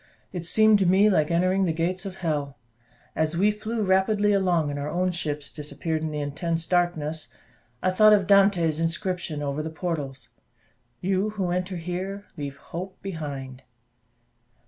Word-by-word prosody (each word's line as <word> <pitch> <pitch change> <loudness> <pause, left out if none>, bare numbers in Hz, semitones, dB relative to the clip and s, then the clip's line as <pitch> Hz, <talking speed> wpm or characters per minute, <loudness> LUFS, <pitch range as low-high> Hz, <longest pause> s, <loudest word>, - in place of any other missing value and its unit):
It 175 -1 -4
seemed 215 +3 +5
to 190 - +2
me 195 +4 +5
like 155 -5 +2
entering 185 +3 +2
the 170 - +1
gates 180 +4 -1
of 190 - -7
hell. 150 -7 -2 0.6
As 160 +1 0
we 205 +4 +4
flew 215 +1 -3
rapidly 205 +2 +3
along, 175 -6 +2
and 145 - -4
our 145 +1 -3
own 180 +3 0
ships 150 -4 -4
disappeared 150 +2 -3
in 160 - -2
the 150 - -4
intense 165 +3 -2
darkness, 160 -5 0 0.5
I 185 - +3
thought 215 +3 +6
of 205 -2 +5
Dante's 190 -5 +4
inscription 165 -2 -2
over 140 +1 -2
the 155 - -4
portals: 150 -4 -4 0.7
"You 190 +3 +1
who 185 -3 0
enter 180 +1 -2
here, 185 +4 -4
leave 140 -3 -5
hope 185 +6 -7
behind." 140 -8 -6
175 Hz, 160 wpm, -26 LUFS, 155-190 Hz, 0.7 s, thought